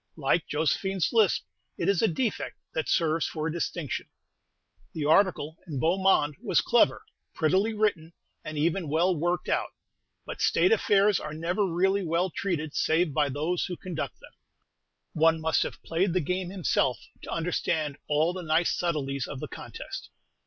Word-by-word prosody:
Like 155 Hz, +3 st, +1 dB
Josephine's 165 Hz, +5 st, 0 dB
lisp, 220 Hz, -5 st, +3 dB, 0.3 s
it 170 Hz, -, -1 dB
is 200 Hz, -3 st, +3 dB
a 225 Hz, -, +4 dB
defect 220 Hz, +6 st, -2 dB, 0.2 s
that 160 Hz, -, -2 dB
serves 165 Hz, -1 st, +2 dB
for 155 Hz, -1 st, -4 dB
a 165 Hz, -, -1 dB
distinction. 170 Hz, -2 st, -3 dB, 0.9 s
The 155 Hz, -3 st, -3 dB
article 160 Hz, -2 st, +2 dB
in 160 Hz, -, -7 dB
the 135 Hz, -, -2 dB
"Beau 170 Hz, +7 st, +2 dB
Monde" 150 Hz, -7 st, +3 dB
was -, -, +2 dB
clever, -, -, +3 dB, 0.3 s
prettily 190 Hz, +8 st, +2 dB
written, 200 Hz, -7 st, 0 dB, 0.3 s
and 155 Hz, 0 st, -6 dB
even 165 Hz, +2 st, 0 dB
well 175 Hz, +5 st, +2 dB
worked 175 Hz, +3 st, -1 dB
out; -, -, -1 dB, 0.5 s
but -, -, -7 dB
state 370 Hz, -, +3 dB
affairs 205 Hz, -, +4 dB
are 150 Hz, 0 st, -6 dB
never 180 Hz, +5 st, 0 dB
really 190 Hz, +3 st, +2 dB
well 170 Hz, +2 st, 0 dB
treated 160 Hz, -5 st, -2 dB
save 160 Hz, -1 st, +1 dB
by 150 Hz, -1 st, +2 dB
those 155 Hz, +6 st, -1 dB
who 180 Hz, -, -5 dB
conduct 175 Hz, -4 st, -5 dB
them. -, -, -16 dB, 0.8 s
One 160 Hz, +1 st, +3 dB
must 160 Hz, 0 st, +1 dB
have -, -, -4 dB
played 170 Hz, +2 st, 0 dB
the 185 Hz, -, +2 dB
game 180 Hz, +3 st, -2 dB
himself 170 Hz, -8 st, +1 dB, 0.2 s
to -, -, -10 dB
understand 160 Hz, -3 st, -1 dB
all 155 Hz, +4 st, +2 dB
the 185 Hz, -, -5 dB
nice 165 Hz, +1 st, +2 dB
subtleties 140 Hz, -6 st, -2 dB
of 135 Hz, -, -6 dB
the -, -, -5 dB
contest. -, -, -8 dB
165 Hz, 165 wpm, -27 LUFS, 155-185 Hz, 0.9 s, a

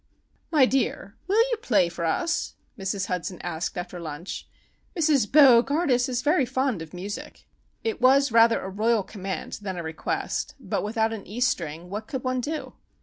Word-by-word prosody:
"My 295 Hz, -5 st, +5 dB
dear, 255 Hz, -5 st, -1 dB
will 445 Hz, +5 st, +4 dB
you 475 Hz, -, +1 dB
play 200 Hz, -, +3 dB
for 170 Hz, 0 st, -4 dB
us?" 335 Hz, -, -1 dB, 0.2 s
Mrs. 195 Hz, -2 st, -2 dB
Hudson 180 Hz, -1 st, -4 dB
asked 170 Hz, +1 st, -3 dB
after 180 Hz, 0 st, -5 dB
lunch. 165 Hz, +2 st, -6 dB, 0.5 s
"Mrs. 295 Hz, -9 st, +2 dB
Bo 265 Hz, -5 st, +8 dB
gardus 270 Hz, -3 st, +1 dB
is 250 Hz, 0 st, -1 dB
very 300 Hz, 0 st, +3 dB
fond 260 Hz, -5 st, -1 dB
of 160 Hz, -1 st, -8 dB
music." 195 Hz, +3 st, -7 dB, 0.4 s
It 445 Hz, -, -2 dB
was 270 Hz, +1 st, +5 dB
rather 230 Hz, 0 st, +5 dB
a 190 Hz, -, -5 dB
royal 220 Hz, +2 st, +1 dB
command 195 Hz, -1 st, -5 dB
than 190 Hz, -3 st, -4 dB
a 170 Hz, -, -4 dB
request, 160 Hz, 0 st, -3 dB
but -, -, -2 dB
without 220 Hz, +1 st, 0 dB
an 215 Hz, -3 st, -7 dB
e 220 Hz, +4 st, -6 dB
string 170 Hz, -9 st, -1 dB
what 215 Hz, +2 st, -5 dB
could 265 Hz, -3 st, -4 dB
one 255 Hz, -1 st, 0 dB
do? 305 Hz, +4 st, -4 dB
225 Hz, 175 wpm, -26 LUFS, 185-265 Hz, 0.5 s, Bo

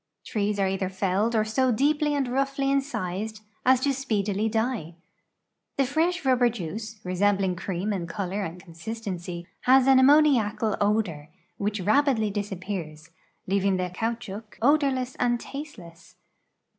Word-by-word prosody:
Trees 210 Hz, -2 st, -1 dB
are 195 Hz, -1 st, +2 dB
either 190 Hz, 0 st, -1 dB
felled 195 Hz, +4 st, 0 dB
or 215 Hz, -1 st, +2 dB
so 255 Hz, +4 st, +1 dB
dee[)ly 295 Hz, +4 st, +2 dB
and 270 Hz, -2 st, 0 dB
roughly 275 Hz, +2 st, 0 dB
incised 215 Hz, -6 st, -2 dB, 0.2 s
as 260 Hz, 0 st, +5 dB
to 280 Hz, -, +1 dB
s[)eedily 220 Hz, -6 st, 0 dB
die. 220 Hz, -7 st, -2 dB, 0.8 s
The 275 Hz, -, +3 dB
fresh 325 Hz, +5 st, 0 dB
rubber 250 Hz, -2 st, +4 dB
juice, 215 Hz, +1 st, -6 dB
resembling 190 Hz, 0 st, +1 dB
cream 190 Hz, +3 st, -3 dB
in 175 Hz, -4 st, -3 dB
color 200 Hz, +2 st, -3 dB
and 170 Hz, 0 st, -6 dB
con 175 Hz, -2 st, -14 dB
sistency, 180 Hz, -2 st, -5 dB, 0.2 s
has 260 Hz, 0 st, +6 dB
an 265 Hz, -1 st, +6 dB
ammouiacal 260 Hz, -7 st, +4 dB
odor, 200 Hz, -8 st, 0 dB, 0.3 s
which 205 Hz, 0 st, -2 dB
rapidly 220 Hz, 0 st, +2 dB
disappears, 185 Hz, -6 st, -5 dB, 0.3 s
leaving 195 Hz, 0 st, +1 dB
the 180 Hz, -1 st, -2 dB
caoutchouc 225 Hz, 0 st, -4 dB
odorless 265 Hz, -1 st, +2 dB
and 240 Hz, -1 st, +2 dB
tasteless. 190 Hz, -, -10 dB
215 Hz, 135 wpm, -26 LUFS, 190-260 Hz, 0.8 s, has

